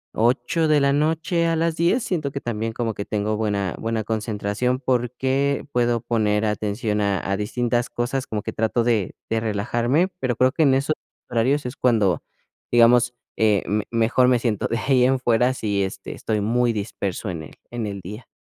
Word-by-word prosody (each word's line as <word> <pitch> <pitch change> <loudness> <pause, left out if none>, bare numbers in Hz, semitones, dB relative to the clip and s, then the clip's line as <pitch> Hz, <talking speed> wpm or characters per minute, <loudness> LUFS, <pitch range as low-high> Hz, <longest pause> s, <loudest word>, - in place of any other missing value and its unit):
8 125 +8 +1
de 155 -1 +4
la 140 0 +3
noche 160 +3 +1
a 165 - +1
las 165 0 0
10, 175 +10 +2
siento 155 - -2
que 140 - -4
también 115 -3 -3
como 115 -1 -2
que 100 - -4
tengo 105 +1 -1
buena 100 -4 -1
buena 115 -1 -2
concentración, 110 +3 -1
porque 130 +2 0
puedo 120 -2 +1
poner 105 -2 +1
atención 105 +1 -1
a 100 -2 +1
a - - +2
distintas 120 +3 -1
cosas, 130 +3 -2
como 105 -2 -3
que - - -4
trato 110 +2 +1
de 115 -5 0
de 115 - 0
relajarme, 120 - 0
pero 125 -2 -1
creo 130 +3 +3
que 160 - -1
en 135 -3 +4
esos 140 +3 +1 0.4
horarios 125 +5 +1
es 125 +2 -4
cuando, 105 -8 +2 0.5
digamos, 120 +1 +5 0.2
eh, 105 -3 +3
me 105 0 0
mejor 115 +2 +3
me 125 -1 +4
siento. 115 -3 -1
De 115 - -1
ahí 125 +2 +2
en 135 +1 +3
fuera, 125 0 +3
sí, 100 -5 -1
este, 95 0 -4
estoy 110 -2 -2
muy 120 +3 +1
disperso 100 -2 -3
en 85 -3 -5
el 80 - -11 0.2
en 120 -3 -3
el 100 -1 -5
día. 105 +6 -9
120 Hz, 190 wpm, -23 LUFS, 105-130 Hz, 0.5 s, digamos